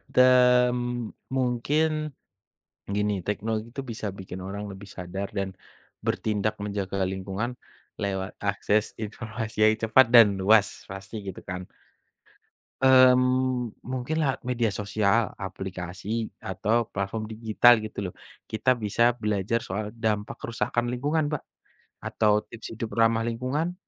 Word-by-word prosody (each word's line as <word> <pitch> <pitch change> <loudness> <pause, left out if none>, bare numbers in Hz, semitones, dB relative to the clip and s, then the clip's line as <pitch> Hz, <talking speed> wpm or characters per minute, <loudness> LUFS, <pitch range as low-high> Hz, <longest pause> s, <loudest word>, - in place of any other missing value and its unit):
Dan 125 -1 +6 0.6
mungkin, 150 +5 0 0.8
gini 105 0 0
teknologi 110 +3 -2
itu 135 - -4
bisa 115 -4 -6
bikin 95 -1 -8
orang 100 +1 -5
lebih 95 +1 -9
sadar 95 +1 -5
dan 95 -2 -3 0.5
bertindak 105 -1 0
menjaga 100 -1 -2
lingkungan 95 +6 -3 0.4
lewat 95 -1 -3
akses 105 +1 0
informasi 110 +1 -6
yang 110 - +5
cepat 115 +4 +6
dan 105 -5 +8
luas 105 +2 +3
pasti 95 +3 -7
gitu 95 - -7
kan. 90 0 -6 1.2
Mmm, 130 -1 +5 0.2
mungkin 130 +4 -2
lewat 135 -3 0
media 120 -2 0
sosial, 105 +2 +1
aplikasi 95 +3 -4 0.2
atau 110 +5 +1
platform 100 +2 -3
digital 115 +1 +5
gitu 100 -4 -5
loh. - - -31 0.4
Kita 125 +4 +2
bisa 115 +2 +2
belajar 105 0 -1
soal 105 +3 -4
dampak 110 0 -1
kerusakan 120 +1 -2
lingkungan, 145 +4 0
Mbak. 150 - -3 0.6
Atau 105 -1 +2
tips 115 -1 -9
hidup 115 -1 -4
ramah 115 0 +3
lingkungan, 130 +9 -1
110 Hz, 120 wpm, -26 LUFS, 100-125 Hz, 1.2 s, dan